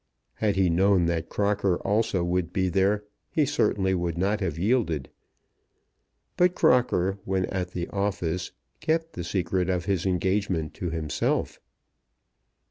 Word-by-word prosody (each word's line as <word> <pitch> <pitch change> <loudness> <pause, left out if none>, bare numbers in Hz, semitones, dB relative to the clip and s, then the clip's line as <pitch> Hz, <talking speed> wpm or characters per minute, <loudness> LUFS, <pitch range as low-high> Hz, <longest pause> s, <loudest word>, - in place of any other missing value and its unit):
Had 105 -3 0
he 95 -1 +3
known 90 +1 +3
that 85 -1 -1
Crocker 100 -3 +1
also 105 -2 +1
would 90 0 -1
be 95 -1 0
there 100 +3 +2 0.3
he 155 - +2
certainly 100 -10 +1
would 85 -2 -1
not 100 +4 +1
have 90 -6 -2
yielded; 90 - 0 1.3
but 180 0 +4
Crocker, 100 -6 +2
when 95 -1 0
at 90 -2 -4
the 85 -1 -3
office, 95 -4 -2 0.3
kept 160 +1 -1
the 85 - -5
secret 90 +1 -1
of 90 -2 0
his 95 -2 0
engagement 95 -3 0
to 90 - -4
himself. 80 -2 -1
95 Hz, 135 wpm, -26 LUFS, 85-100 Hz, 1.3 s, but